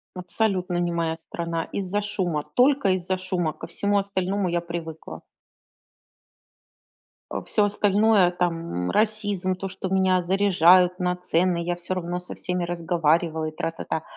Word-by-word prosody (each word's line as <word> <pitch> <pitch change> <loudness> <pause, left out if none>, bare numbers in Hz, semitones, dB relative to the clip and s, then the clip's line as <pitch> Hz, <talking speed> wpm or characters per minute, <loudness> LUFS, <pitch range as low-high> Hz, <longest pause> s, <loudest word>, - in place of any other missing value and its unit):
Абсолютно 180 0 -1
не 175 0 0
моя 165 -1 -1
страна. 165 0 -4
Из-за 200 +1 -1
шума, 175 -7 -2
только 260 -4 +4
из-за 185 0 -1
шума, 180 -4 -2
ко - - -9
всему 205 0 0
остальному 195 0 -1
я 170 0 0
привыкла. 165 -2 -7 2.1
Э, - - -3
всё 210 - +2
остальное 205 -2 +3
там, 165 - -2
м, - - -1
расизм, 205 -4 0
то, 195 +1 -5
что 190 0 -5
меня 190 -1 +3
заряжают 180 -1 +4
на 180 0 0
цены, 180 0 +1
я 175 +1 -1
всё 175 +2 -4
равно 175 0 -3
со 180 - -9
всеми 180 -1 -3
разговариваю 165 -2 0
и - - -22
тра-та-та, 165 -1 -3
180 Hz, 145 wpm, -24 LUFS, 170-195 Hz, 2.1 s, только